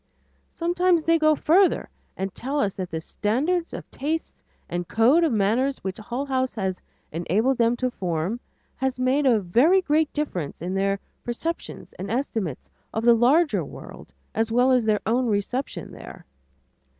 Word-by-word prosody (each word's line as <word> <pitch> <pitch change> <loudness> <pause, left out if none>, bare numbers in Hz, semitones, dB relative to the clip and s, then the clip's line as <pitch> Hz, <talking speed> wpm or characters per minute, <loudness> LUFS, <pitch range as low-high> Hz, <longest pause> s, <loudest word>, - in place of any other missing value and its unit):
Sometimes 350 -1 +1
they 330 0 +4
go 310 0 +4
further 360 +6 +3 0.3
and 190 0 -3
tell 275 +4 -3
us 195 -7 +1
that 185 -2 -5
the 160 - -3
standards 285 - -1
of - - -7
tastes 315 +4 -4 0.2
and 175 0 -3
code 255 +10 +4
of 325 - +2
manners 230 +6 +1
which 190 +1 -4
Hull 240 +6 -4
House 260 -2 -1
has 190 -4 -2 0.3
enabled 205 - 0
them 230 +1 +3
to 255 0 -1
form, 180 +2 -2 0.4
have 265 -1 -1
made 260 +3 +2
a 235 -4 +5
very 245 - +4
great 310 -3 +1
difference 185 - -3
in 180 +3 -4
their 195 +1 0 0.2
perceptions 325 +8 -5
and 195 +2 -5
estimates 225 - -2 0.2
of 220 +1 -2
the 240 - +8
larger 285 +8 +3
world - - -11 0.2
as 225 0 0
well 250 +3 +4
as 250 -3 +3
in - - -4
their 210 -1 +2
own 245 +3 +1
reception 225 +6 -2
there. - - -11
245 Hz, 165 wpm, -24 LUFS, 200-290 Hz, 0.4 s, the